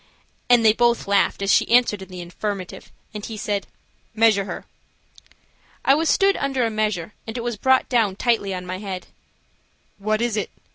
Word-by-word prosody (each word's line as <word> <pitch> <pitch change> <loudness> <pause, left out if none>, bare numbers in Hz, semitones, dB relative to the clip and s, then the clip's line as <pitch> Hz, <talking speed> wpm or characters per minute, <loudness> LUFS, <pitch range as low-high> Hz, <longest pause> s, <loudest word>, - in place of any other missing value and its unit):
and 240 -2 +5
they 215 - +7
both 235 -1 +1
laughed 200 0 +2
as 195 - +2
she - - +3
answered 235 -4 +3
in 190 - -10
the 180 -1 -7
affirmative, 185 +1 -6 0.2
and 210 -1 -6
he 225 - -7
said: 205 -2 -2 0.5
"Measure 215 -3 +4
her." - - -7 1.2
I 270 - +6
was 315 +3 +1
stood 390 0 +4
under 270 -3 0
a 225 - -1
measure, 215 -4 -2
and 225 +2 -5
it - - -3
was 240 -1 -2
brought 260 +5 +2
down 225 -6 +1
tightly 220 -3 0
on 180 -1 -5
my 185 +1 -5
head. 190 -3 -6 0.9
"What 215 +2 0
is 235 -2 0
it?" 210 - -2
215 Hz, 185 wpm, -22 LUFS, 195-240 Hz, 1.2 s, they